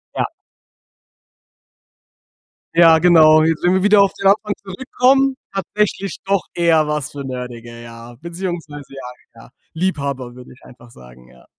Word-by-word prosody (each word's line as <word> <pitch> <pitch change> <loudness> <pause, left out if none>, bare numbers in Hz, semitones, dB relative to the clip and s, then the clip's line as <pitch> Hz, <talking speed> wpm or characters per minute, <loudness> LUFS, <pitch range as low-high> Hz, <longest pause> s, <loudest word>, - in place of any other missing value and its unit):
Ja - - 0 2.5
Ja, 165 -1 +6
genau, 155 -2 +5
jetzt, 160 0 -1
wenn 180 - +3
wir 190 - +1
wieder 205 0 +5
auf 195 - -1
die - - -10
Leinwand 205 +2 +2
zurückkommen, 260 +6 +1 0.2
tatsächlich 195 +1 -3
doch 195 -1 0
eher 165 -3 +2
was 150 -2 -3
für 140 -1 -8
Nerdige, 120 -2 -8
ja, 115 0 -12
beziehungsweise 170 -5 -7
ja, 125 -3 -13
ja, - - -17 0.2
Liebhaber, 140 -8 -4
würde 125 -1 -14
ich 125 - -23
einfach 120 -1 -17
sagen, 60 - -17
ja. 65 -1 -21
155 Hz, 140 wpm, -18 LUFS, 125-190 Hz, 2.5 s, Ja